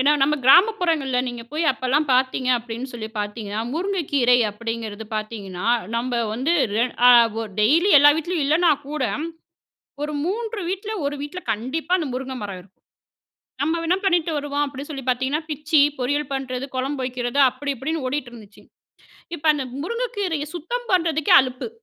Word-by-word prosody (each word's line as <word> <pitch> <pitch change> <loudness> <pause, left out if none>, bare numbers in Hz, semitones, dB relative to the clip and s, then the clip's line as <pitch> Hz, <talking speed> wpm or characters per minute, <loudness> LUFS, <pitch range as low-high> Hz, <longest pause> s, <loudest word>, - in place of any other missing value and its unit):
ஏன்னா, 285 +3 +4
நம்ம 300 +2 +3
கிராமப்புறங்களில 325 - +4
நீங்க 240 -1 -6
போய் 320 +2 -1
அப்பலாம் 265 +4 0
பாத்தீங்க 255 0 +1
அப்படின்னு 235 +2 -6
சொல்லி 220 -2 -6
பாத்தீங்கன்னா, 210 0 -4
முருங்கைக்கீரை 290 -9 +2
அப்டீங்கிறது 225 0 -5
பாத்தீங்கன்னா, 210 -3 -5 0.3
நம்ம 240 0 -1 0.2
வந்து 270 +8 0 0.2
ரெ 235 - +3 0.2
அ - - +10 0.3
ஒ - - -2 0.2
டெய்லி 325 - +4
எல்லா 290 +1 +8
வீட்லேயும் 325 -1 -1
இல்லைன்னா 325 +3 +4 0.2
கூட, 300 -3 -2 1.0
ஒரு 300 0 -3
3 440 +3 -3
வீட்ல, 400 +3 -4 0.2
1 290 - -3
வீட்ல 295 +5 -6
கண்டிப்பா 265 - -2
அந்த 315 -5 -2
முருங்கை 260 0 -4
மரம் 195 -3 -6
இருக்கும். 190 +1 -23 0.9
நம்ம 325 +3 0
வேணா 345 +3 +2
பண்ணிட்டு 345 -3 +2
வருவோம் 290 0 -1
அப்படின்னு 280 +2 -8
சொல்லி 270 -3 -6
பாத்தீங்கன்னா, 260 +5 -1
பிச்சி 300 0 +2 0.2
பொரியல் 285 +3 -1
பண்ணுறது, 265 0 -4
குழம்பு 265 +1 -2
வைக்கிறது 250 +1 -3
அப்படி 280 +2 -4
இப்படின்னு 300 +3 -3
ஓடிட்டு 260 -2 -3
இருந்துச்சு. 215 -3 -14 0.7
இப்ப 320 - -12
அந்த 270 -3 -3 0.2
முருங்கைக்கீரையை 410 -9 -2
சுத்தம் 480 +9 -5
பண்ணுறதுக்கே 325 -4 +3
அலுப்பு. 255 - -5
280 Hz, 150 wpm, -22 LUFS, 245-325 Hz, 1.0 s, அ